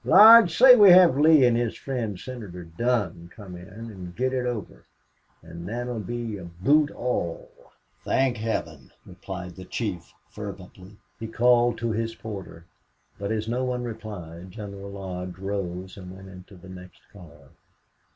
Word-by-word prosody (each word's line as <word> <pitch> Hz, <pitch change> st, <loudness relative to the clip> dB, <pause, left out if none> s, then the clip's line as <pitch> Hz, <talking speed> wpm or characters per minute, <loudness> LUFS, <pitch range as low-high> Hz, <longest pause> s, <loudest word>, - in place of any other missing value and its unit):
Lodge, 220 Hz, -6 st, +8 dB
say 255 Hz, 0 st, +9 dB
we 205 Hz, -4 st, +8 dB
have 180 Hz, -5 st, +7 dB
Lee 150 Hz, -1 st, +5 dB
and 120 Hz, -1 st, +3 dB
his 120 Hz, -1 st, -1 dB
friend 115 Hz, -8 st, -4 dB
Senator 105 Hz, -9 st, -8 dB
Dunn 85 Hz, -1 st, -2 dB
come 100 Hz, -4 st, -10 dB
in, 90 Hz, +1 st, -11 dB
and 100 Hz, -4 st, -10 dB
get 130 Hz, +2 st, -1 dB
it 125 Hz, -1 st, -1 dB
over. 115 Hz, -6 st, -6 dB, 0.6 s
An' 85 Hz, +1 st, -10 dB
thet'll 120 Hz, +2 st, -4 dB
be 115 Hz, +1 st, -5 dB
aboot 100 Hz, -, +1 dB
all!" 120 Hz, -9 st, -4 dB, 0.5 s
"Thank 130 Hz, -2 st, +1 dB
Heaven!" 110 Hz, +1 st, -4 dB, 0.2 s
replied 90 Hz, -1 st, -8 dB
the 95 Hz, -, -10 dB
chief, 95 Hz, -3 st, -5 dB, 0.2 s
fervently. 100 Hz, -1 st, -10 dB, 0.2 s
He 115 Hz, -, -5 dB
called 120 Hz, +1 st, +3 dB
to 115 Hz, 0 st, -2 dB
his 115 Hz, +1 st, -3 dB
porter, 95 Hz, -7 st, -9 dB, 0.5 s
but 100 Hz, +1 st, -3 dB
as 110 Hz, 0 st, -2 dB
no 125 Hz, +3 st, -1 dB
one 125 Hz, -1 st, -2 dB
replied, 100 Hz, -7 st, -8 dB
General 100 Hz, 0 st, -9 dB
Lodge 90 Hz, -2 st, -7 dB
rose 95 Hz, -1 st, -5 dB
and 90 Hz, -1 st, -10 dB
went 95 Hz, 0 st, -12 dB
into 90 Hz, +1 st, -13 dB
the 95 Hz, +1 st, -14 dB
next 90 Hz, 0 st, -12 dB
car. 75 Hz, -8 st, -16 dB
105 Hz, 150 wpm, -25 LUFS, 90-120 Hz, 0.6 s, say